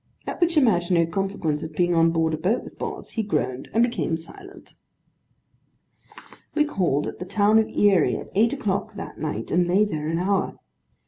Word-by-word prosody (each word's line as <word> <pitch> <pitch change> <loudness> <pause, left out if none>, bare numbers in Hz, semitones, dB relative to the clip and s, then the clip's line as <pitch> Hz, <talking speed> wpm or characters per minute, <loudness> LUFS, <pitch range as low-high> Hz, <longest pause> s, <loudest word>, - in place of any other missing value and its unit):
at - - -6
which 335 -1 +2
imaginary 175 - +3
consequence 165 -3 -2
of 160 0 -6
being 175 +1 +2
on 165 0 +4
board 165 -1 +1
a - - -1
boat 185 +9 0
with - - -13
Boz, - - -5
he 225 - -1
groaned, 130 - -2
and 225 +2 +3
became 235 -8 0
silent. 385 - -11 1.8
We 300 -1 +3
called 175 - 0
at - - -7
the 180 - -5
town 205 +3 +3
of 220 - 0
Erie, 195 -6 +3
at - - -9
eight 225 +4 +3
o'clock 210 -7 -2
that 195 - -8
night, 155 -1 -4
and 175 0 +2
lay 195 +4 +3
there 155 -7 -3
an 165 +1 -1
hour. 190 +2 0
185 Hz, 185 wpm, -24 LUFS, 165-215 Hz, 1.8 s, on